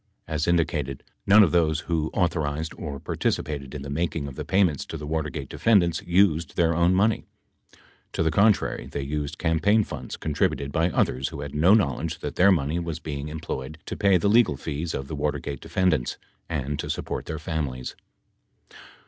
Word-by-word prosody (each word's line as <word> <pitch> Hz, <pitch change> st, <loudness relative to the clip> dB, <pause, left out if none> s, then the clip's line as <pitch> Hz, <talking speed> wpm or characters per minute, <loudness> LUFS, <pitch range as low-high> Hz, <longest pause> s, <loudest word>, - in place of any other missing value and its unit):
As 80 Hz, +1 st, -1 dB
indicated, 80 Hz, -6 st, 0 dB, 0.2 s
none 105 Hz, +2 st, +8 dB
of 85 Hz, -, +2 dB
those 80 Hz, -3 st, +2 dB
who 80 Hz, -2 st, -1 dB
authorized 80 Hz, -4 st, 0 dB
or 70 Hz, -4 st, -6 dB
par -, -, -5 dB
ticipated 70 Hz, -2 st, -2 dB
in 70 Hz, -, -5 dB
the 70 Hz, -, -7 dB
making 80 Hz, -1 st, -1 dB
of 70 Hz, -, -7 dB
the -, -, -5 dB
payments 90 Hz, -5 st, +2 dB
to 80 Hz, -, -5 dB
the 75 Hz, -, -7 dB
Watergate 75 Hz, -2 st, -3 dB
defendants 90 Hz, -7 st, +2 dB
used 85 Hz, -2 st, +2 dB
their 85 Hz, -2 st, +3 dB
own 85 Hz, +2 st, +3 dB
money; 105 Hz, +4 st, +2 dB, 0.9 s
to -, -, 0 dB
the 80 Hz, -, +2 dB
contrary 100 Hz, -, +2 dB
they 70 Hz, 0 st, -4 dB
used 75 Hz, +1 st, -3 dB
campaign 85 Hz, +7 st, +3 dB
funds -, -, -7 dB
contributed 70 Hz, -2 st, -1 dB
by 85 Hz, +2 st, +2 dB
others 65 Hz, -5 st, 0 dB
who 70 Hz, -, -7 dB
had 70 Hz, -1 st, -6 dB
no 85 Hz, +8 st, +5 dB
knowledge 80 Hz, -, 0 dB
that 75 Hz, -1 st, -6 dB
their 100 Hz, +2 st, +6 dB
money 80 Hz, -1 st, +1 dB
was 85 Hz, -2 st, -4 dB
being 75 Hz, -2 st, -5 dB
employed 75 Hz, -2 st, -5 dB
to -, -, -5 dB
pay 100 Hz, -2 st, +4 dB
the 90 Hz, -, 0 dB
legal 105 Hz, -, +4 dB
fees 80 Hz, +3 st, -4 dB
of 65 Hz, -, -4 dB
the 80 Hz, -, -5 dB
Watergate 70 Hz, -1 st, -3 dB
defendants 85 Hz, -9 st, 0 dB, 0.3 s
and 75 Hz, -3 st, -2 dB
to -, -, -4 dB
support -, -, -3 dB
their 80 Hz, -, -3 dB
families. 75 Hz, -6 st, -4 dB
80 Hz, 180 wpm, -25 LUFS, 70-85 Hz, 0.9 s, none